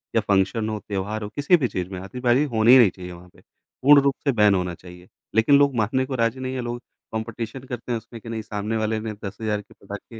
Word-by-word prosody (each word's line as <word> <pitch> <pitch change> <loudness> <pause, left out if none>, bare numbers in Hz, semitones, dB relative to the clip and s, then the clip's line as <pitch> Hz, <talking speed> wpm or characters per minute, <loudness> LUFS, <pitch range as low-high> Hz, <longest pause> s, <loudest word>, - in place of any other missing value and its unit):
या - - +4
फंक्शन 100 +3 +1
हो - - -3
या - - -5
त्यौहार 105 +2 -3
हो 105 - -5
किसी 150 +5 +4
भी 135 -6 0
चीज़ 90 -5 -4
में 95 -2 -6
आतिशबाज़ी 125 +7 +1
होनी 115 +3 +7
नहीं 120 -6 +7
चाहिए 90 0 -10
वहाँ 90 +1 -13
पे, - - -22
पूर्ण 145 +2 +2
रूप 140 -1 +1
से 140 - +2
बैन 105 -4 +4
होना 90 -1 -1
चाहिए। 90 +1 -14 0.3
लेक़िन 110 +6 +5
लोग 140 -2 +3
मानने 120 +4 +1
को 130 0 -4
राज़ी 115 +1 0
नहीं 130 0 -4
हैं 130 - -2
लोग 120 0 -5 0.3
कॉम्पिटिशन 115 +3 -5
करते 125 -1 -6
हैं 120 - +1
उसमें 115 +1 -11
कि 115 - -10
नहीं 115 -1 -3
सामने 105 +1 -3
वाले 110 0 -1
ने 110 0 -5
10,000 105 +1 -3
के - - -20
पटाखे 100 +3 -10
110 Hz, 245 wpm, -23 LUFS, 100-125 Hz, 0.3 s, होनी